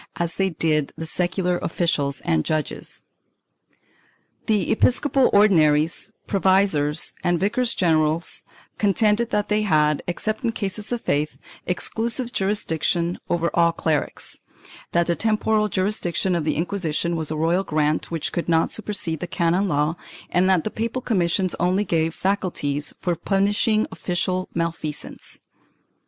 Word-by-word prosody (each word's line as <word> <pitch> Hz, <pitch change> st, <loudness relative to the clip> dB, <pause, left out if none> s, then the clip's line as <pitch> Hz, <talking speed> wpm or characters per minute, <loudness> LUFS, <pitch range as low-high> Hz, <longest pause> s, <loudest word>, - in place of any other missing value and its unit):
as 170 Hz, -1 st, -2 dB
they 195 Hz, 0 st, 0 dB
did 155 Hz, -3 st, 0 dB
the 160 Hz, -, -4 dB
secular 180 Hz, +2 st, -1 dB
officials 155 Hz, -5 st, -1 dB
and 80 Hz, -1 st, +1 dB
judges. 155 Hz, -1 st, -3 dB, 1.4 s
The 210 Hz, -5 st, +1 dB
episcopal 265 Hz, +3 st, +3 dB
Ordinaries, 165 Hz, -3 st, +3 dB, 0.2 s
provisors 190 Hz, -7 st, +2 dB
and 175 Hz, -1 st, +2 dB
vicars 235 Hz, +5 st, 0 dB
general 160 Hz, -2 st, +2 dB, 0.6 s
contended 210 Hz, +3 st, +2 dB
that 210 Hz, -3 st, -1 dB
they 210 Hz, 0 st, +2 dB
had, 150 Hz, -7 st, +2 dB
except 215 Hz, +7 st, -3 dB
in 230 Hz, -1 st, 0 dB
cases 205 Hz, +1 st, -3 dB
of 240 Hz, -1 st, -1 dB
faith, 150 Hz, +1 st, -1 dB, 0.3 s
exclusive 230 Hz, +6 st, -1 dB
jurisdiction 175 Hz, -3 st, 0 dB
over 170 Hz, 0 st, 0 dB
all 170 Hz, -1 st, +4 dB
clerics; 155 Hz, -3 st, -2 dB, 0.5 s
that 170 Hz, 0 st, +2 dB
the 170 Hz, -, +1 dB
temporal 215 Hz, 0 st, +1 dB
jurisdiction 190 Hz, -2 st, 0 dB
of 170 Hz, -3 st, -1 dB
the 155 Hz, -, +1 dB
Inquisition 170 Hz, -1 st, -1 dB
was 160 Hz, -2 st, -2 dB
a 155 Hz, -, -2 dB
royal 170 Hz, +4 st, +2 dB
grant 155 Hz, -2 st, 0 dB
which 165 Hz, -3 st, -3 dB
could 170 Hz, -, -3 dB
not 165 Hz, -1 st, +2 dB
supersede 195 Hz, -7 st, -2 dB
the 175 Hz, -, -4 dB
canon 170 Hz, +4 st, +1 dB
law 150 Hz, 0 st, 0 dB, 0.3 s
and 180 Hz, +1 st, +3 dB
that 185 Hz, -4 st, +3 dB
the 215 Hz, -, -3 dB
papal 230 Hz, +3 st, -3 dB
commissions 185 Hz, -3 st, +1 dB
only 185 Hz, +3 st, +2 dB
gave 160 Hz, -2 st, 0 dB
faculties 175 Hz, -7 st, -1 dB
for 175 Hz, -2 st, 0 dB
punishing 205 Hz, +5 st, +1 dB
official 185 Hz, +1 st, -2 dB
malfeasance. 165 Hz, -3 st, -4 dB
175 Hz, 135 wpm, -23 LUFS, 160-205 Hz, 1.4 s, all